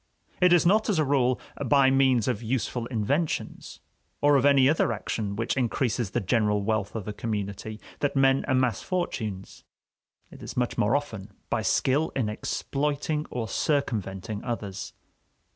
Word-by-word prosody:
It 180 -1 +6
is 175 -2 +5
not, 215 +5 +3
as 200 - +2
a 155 - +3
rule, 130 -2 +2 0.2
by 135 0 +4
means 130 -4 +3
of 120 -4 -1
useful 120 0 -2
inventions, 135 +8 -2 0.4
or 145 0 +4
of 140 0 +4
any 135 -2 +5
other 150 -4 +2
action 105 -1 -3
which 115 +2 -1
increases 120 -3 0
the 120 - -1
general 105 -1 +1
wealth 110 -1 -1
of 110 -4 -4
the 105 - -4
community, 105 0 -4 0.2
that 145 - -1
men 135 0 +4
amass 130 -6 +1
fortunes; 110 - -4 0.7
it - - -13
is - - -8
much 125 -1 0
more 105 +6 +2
often 110 -9 -4 0.2
by - - +1
skill 145 +5 +1
in 120 -6 0
exploiting 145 +7 -2
or 115 -3 -3
circumventing 110 - -2
others. 105 -6 -5
125 Hz, 155 wpm, -26 LUFS, 105-140 Hz, 0.7 s, It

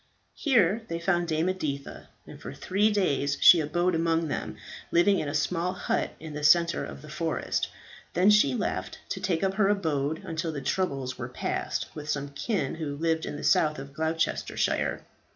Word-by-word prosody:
Here 225 - +2
they 165 - -3
found 175 0 +1
Dame 160 +1 0
Editha, 145 -7 -4 0.2
and - - -12
for - - -7
three 200 +3 +1
days 145 -9 +1
she 175 - +8
abode 175 +4 0
among 165 -1 +1
them, - - -4 0.3
living 190 +3 +4
in 150 - -3
a 145 - -4
small 170 +4 0
hut 185 - -2
in 155 -1 -8
the 150 0 -5
centre 170 +2 +4
of 70 0 -8
the - - -10
forest. - - -2 0.5
Then 185 +4 +5
she 175 -12 +4
left, 95 -5 -3
to - - -3
take 185 -2 0
up 190 0 +1
her 195 0 +2
abode, 160 -6 0
until 165 0 -3
the 150 - -4
troubles 135 -4 -2
were 120 0 -4
past, 125 - -2
with 150 0 -8
some 145 -1 -2
kin 140 - -2
who 155 -3 -4
lived 160 +1 0
in - - -4
the - - -7
south 155 -1 +3
of 140 +1 -9
Gloucestershire. 160 +2 -1
160 Hz, 185 wpm, -27 LUFS, 145-185 Hz, 0.5 s, she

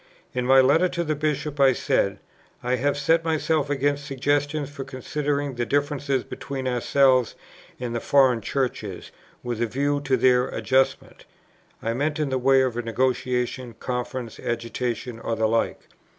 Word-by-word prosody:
In 125 0 -1
my 135 0 +7
Letter 160 +7 +4
to 170 - -2
the 155 -2 -1
Bishop 150 -1 -2
I 135 -1 +6
said, - - 0 0.5
"I 125 +1 +1
have 145 +2 0
set 165 +4 +2
myself 160 -2 0
against 145 0 0
suggestions 145 +1 -1
for 140 -1 -6
considering 140 +1 -2
the 120 -1 -2
differences 145 -2 0
between 135 -1 -5
ourselves 130 0 +3 0.4
and 125 -2 -4
the 120 - -1
foreign 130 -3 +3
Churches 110 -6 -3 0.3
with 120 -2 -3
a 120 - +2
view 145 +4 0
to 135 -2 +1
their 125 +1 +4
adjustment." 135 0 0 0.6
(I 115 - 0
meant 145 +4 -1
in 150 -2 -1
the 130 - +1
way 135 +1 +4
of 125 -3 -2
negotiation, 125 0 -1
conference, 125 -1 -4
agitation, 120 0 -3
or 115 - -2
the 110 0 +1
like.) 115 +1 0
130 Hz, 155 wpm, -24 LUFS, 125-145 Hz, 0.6 s, my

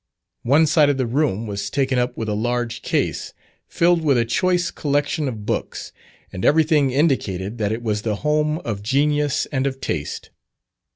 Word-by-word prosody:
One 145 +6 +4
side 150 -1 +4
of 140 - +1
the 130 - 0
room 120 -3 0
was 100 -2 -4
taken 135 -2 0
up 125 0 -1
with 110 - -3
a 105 - -1
large 120 +2 -2
case, - - -2 0.3
filled 170 0 +2
with 140 -4 +3
a 115 - +2
choice 180 +8 +1
collection 145 +1 -1
of 110 -5 -5
books, - - -3 0.4
and 95 - -5
everything 155 -2 +3
indicated 120 - 0
that 105 -1 0
it 115 +2 -3
was 105 -2 -1
the 110 -1 -1
home 150 0 +1
of 105 -4 -3
genius 145 +5 +1
and 135 -2 0
of 135 -1 -4
taste. 75 - -4
130 Hz, 175 wpm, -21 LUFS, 110-150 Hz, 0.4 s, One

